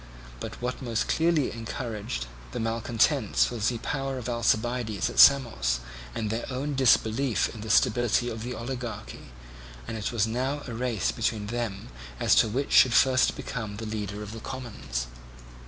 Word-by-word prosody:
But - - -7
what 125 +2 -3
most 115 -3 -1
clearly 160 -4 +2
encouraged 110 - -4 0.3
the - - -3
malcontents 115 - +1
was 115 -2 0
the 120 - -2
power 135 +2 -3
of 125 -2 -5
Alcibiades 120 -2 0
at - - -3
Samos, 115 - +5 0.4
and 110 -2 -2
their 115 +2 -3
own 135 +3 -2
disbelief 130 -1 +2
in 110 - -9
the 110 - -6
stability 120 +2 +3
of 115 -2 -4
the 125 +2 -4
oligarchy; 120 - -6 0.6
and - - -4
it 110 -1 -3
was 115 -3 +2
now 130 +6 -2
a 120 - -6
race 115 - -1
between 105 - -1
them 115 -5 -3 0.3
as - - +3
to - - +5
which 135 +6 -2
should 125 -3 +6
first 130 -1 +4
become 110 -5 -5
the 110 - -5
leader 105 -1 -4
of 105 - -8
the 115 - -7
commons. 110 - -5
115 Hz, 165 wpm, -27 LUFS, 110-125 Hz, 0.6 s, should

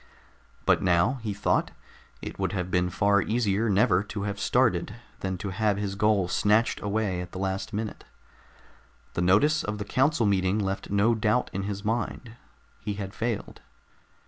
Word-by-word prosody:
But - - +4
now, 90 +9 +2
he 110 -2 -3
thought, 100 - +1 0.5
it - - -7
would - - -1
have 90 -2 -3
been 90 0 +2
far 100 +2 +3
easier 110 0 +1
never 95 -2 +4
to 105 -1 -5
have 100 -1 -3
started 105 -4 +1 0.2
than 95 -1 -3
to 95 +2 -5
have 105 0 +1
his 100 -1 -2
goal 100 -2 +2
snatched 105 +5 +2
away 100 -3 -1
at 90 -1 -9
the - - -6
last 95 0 -2
minute. 110 +1 -4 1.1
The - - -1
notice 105 - +4
of 105 +1 -3
the 105 - -5
council 130 +2 +2
meeting 95 -1 +2
left 95 -2 -2
no 100 +4 +3
doubt 110 +2 +1
in 95 +1 -2
his 100 0 -5
mind. 115 +1 -2 0.4
He 105 - -4
had 100 -1 -6
failed. 115 -2 -3
100 Hz, 170 wpm, -27 LUFS, 95-110 Hz, 1.1 s, But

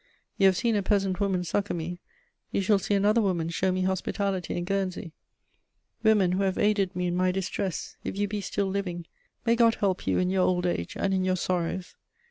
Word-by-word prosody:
You 195 - +7
have 190 -1 +3
seen 230 -2 +1
a 205 - +2
peasant 195 -2 0
woman 190 -3 +1
succour 200 +3 -1
me; 175 +1 -5 0.5
you - - 0
shall 205 +1 +3
see 200 +2 0
another 210 +3 +3
woman 175 -5 0
show 185 +3 0
me 185 0 0
hospitality 190 0 -1
in 175 - -2
Guernsey. 185 -3 -2 0.9
Women 210 -5 +4
who 185 +2 0
have 190 -1 0
aided 205 -3 +1
me 180 0 -1
in 175 0 0
my 185 0 +2
distress, 190 -1 -3
if - - -4
you 205 0 +1
be 205 0 -3
still 200 +1 -1
living, 190 -3 -3 0.4
may 230 0 +4
God 230 -1 +4
help 195 -3 -1
you - - +2
in 180 0 +1
your 190 -1 +2
old 180 -1 +1
age 85 - -2
and 195 - 0
in 190 -1 +1
your 185 0 +1
sorrows! 180 0 -2
190 Hz, 210 wpm, -27 LUFS, 180-200 Hz, 0.9 s, You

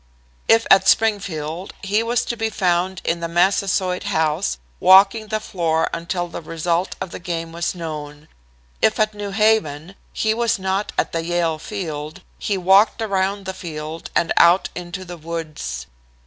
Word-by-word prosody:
"If 225 0 +5
at 195 0 +6
Springfield, 185 -6 0
he 205 +3 +1
was 235 0 0
to 235 - -3
be 225 -1 -1
found 185 -2 0
in 170 - 0
the 170 - -3
Massasoit 185 +1 +1
House, 155 - 0 0.2
walking 195 +4 +6
the 215 0 -1
floor 165 -6 -1
until 175 +1 -2
the 170 - -7
result 165 +3 -1
of 180 - -5
the - - -7
game 165 -1 -4
was 170 +2 -2
known. 150 -3 -7 0.5
If 220 - +3
at 215 0 +2
New 205 -1 -5
Haven, 195 -6 +1 0.2
he 220 0 0
was 235 0 +1
not 190 +2 -2
at - - 0
the 165 0 -2
Yale 170 -2 0
Field. 155 -5 -6 0.2
He 200 - -1
walked 190 +5 +4
around 200 -2 -1
the 190 - -4
field 160 -2 -7
and 170 - +2
out 175 +3 +5
into 180 +1 -6
the 175 -1 -8
woods. 155 - -5
180 Hz, 160 wpm, -21 LUFS, 165-200 Hz, 0.5 s, at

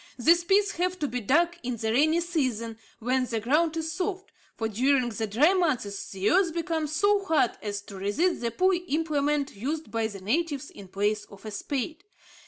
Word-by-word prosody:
These 335 +7 +4
pits 405 +2 +3
have 365 +1 0
to 300 - -1
be 250 -1 -3
dug 340 +10 +2
in 245 -1 -3
the 220 0 -1
rainy 310 +7 +3
season, 250 -10 -2 0.2
when 255 +2 0
the 230 -2 -1
ground 310 +8 +1
is 320 0 -2
soft; 380 +4 -3 0.3
for 225 - -1
during 250 +3 +2
the 220 0 -3
dry 275 - +4
months 255 - -1
the 195 +1 0
earth 350 -3 +3
becomes 325 -3 -1
so 405 +5 +3
hard 320 -9 +3
as 205 -1 -4
to 200 -2 -10
resist 255 - 0
the 235 - 0
poor 370 - +2
implement 295 -3 0
used 300 +9 -4
by 225 -1 0
the 200 -3 -8
natives 285 - -1
in 200 - -11
place 205 +2 -1
of 200 +1 -15
a 215 - -5
spade. 285 - -4
280 Hz, 190 wpm, -27 LUFS, 225-335 Hz, 0.3 s, These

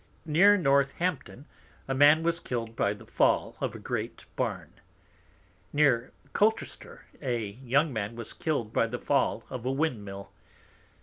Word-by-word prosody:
Near 190 +7 +6
Northampton, 140 0 0 0.4
a 135 - -1
Man 145 +4 +6
was 170 0 +1
killed 115 -5 -4
by 100 -3 +1
the 110 +2 -14
Fall - - +1
of - - -2
a - - -5
great - - -4
Barn. - - -3 1.0
Near 135 -5 +2 0.2
Colchester, 220 +2 -1 0.2
a 120 -5 -1
Young 130 +8 0
man 110 0 -3
was 115 -1 -6
killed 125 -9 -2
by 115 - +2
the 120 +2 -4
Fall 140 +1 0
of 125 -3 -5
a 130 - 0
Wind 135 -6 -1
mill. 100 0 -9
135 Hz, 145 wpm, -28 LUFS, 115-150 Hz, 1.0 s, Near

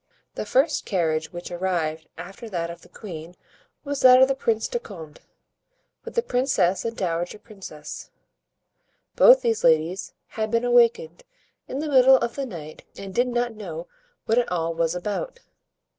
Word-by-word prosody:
The - - -5
first 280 +7 +2
carriage 160 -5 0
which 175 -1 -8
arrived 170 -3 -2
after 195 +7 -9
that 170 -3 -3
of 170 0 -11
the - - -18
queen 170 -4 -9 0.5
was 285 -1 -3
that 255 0 +8
of 260 - +7
the 270 - +1
Prince 225 -4 -1
de 240 - -2
Condé, 165 -10 -11 0.8
with - - -9
the 470 - +2
princess 245 - +1
and 230 0 -4
dowager 175 +1 -2
princess. 195 -9 -10 1.1
Both - - +7
these 460 -2 0
ladies 165 +4 +1
had 220 -1 -3
been 230 +2 +1
awakened 235 -9 +3 0.5
in 265 - -5
the 305 +2 -3
middle 265 -2 +6
of 235 -1 -2
the 275 -1 -3
night 155 -7 -9
and 195 -1 -8
did 245 +5 +2
not 240 -1 -1
know 175 -6 -7 0.4
what 225 +2 +3
it 240 - -2
all 165 -2 -1
was 165 +1 0
about. 345 - -4
205 Hz, 165 wpm, -24 LUFS, 170-245 Hz, 1.1 s, that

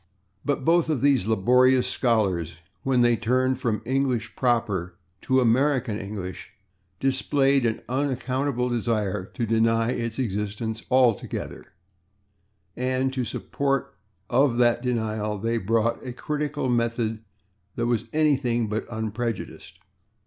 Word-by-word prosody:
But 145 -2 -1
both 170 -1 +3
of 150 -6 0
these 135 -7 +3
laborious 125 +4 +4
scholars, 95 - 0 0.2
when 130 -2 +2
they 120 0 +4
turned 130 +4 +1
from 115 -4 -1
English 130 -3 -1
proper 105 -8 0 0.3
to 130 0 +2
American 125 -2 +2
English, 95 -3 -7 0.5
displayed 135 0 +2
an 110 - -2
unaccountable 130 -1 -1
desire 105 -5 -1
to 120 - -1
deny 115 +1 +2
its 115 -2 -3
existence 110 -1 -3
altogether, 125 -4 +1 1.1
and 130 +1 0
to 130 - -1
the 120 - -3
support 140 +3 -2 0.3
of 130 -1 +2
that 120 -1 +3
denial 110 -4 -1
they 115 +3 -1
brought 115 +3 0
a 125 -2 -6
critical 150 +1 -2
method 115 -2 0 0.5
that 120 - -1
was 120 -2 -1
anything 135 -7 +1
but 105 +1 -3
unprejudiced. 110 -6 -4
120 Hz, 120 wpm, -25 LUFS, 110-130 Hz, 1.1 s, laborious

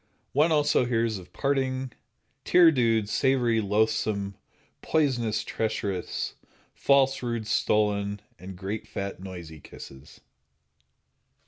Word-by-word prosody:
One 150 +4 +3
also 145 -4 +3
hears 115 -3 0
of 90 - -14
parting, 130 -2 -1 0.5
tear 175 -2 +6
dewed, 115 -6 +2
savory, 120 -1 +2
loathsome, 105 -1 0 0.5
poisonous, 125 -8 0
treacherous, 100 -4 -3 0.4
false, 135 -1 +3
rude, 115 -3 -3
stolen, 105 -1 +1 0.2
and 90 +1 -9
great 100 +3 -5
fat 100 -1 -5
noisy 90 -4 -9
kisses. 70 0 -13
110 Hz, 100 wpm, -27 LUFS, 100-130 Hz, 0.5 s, tear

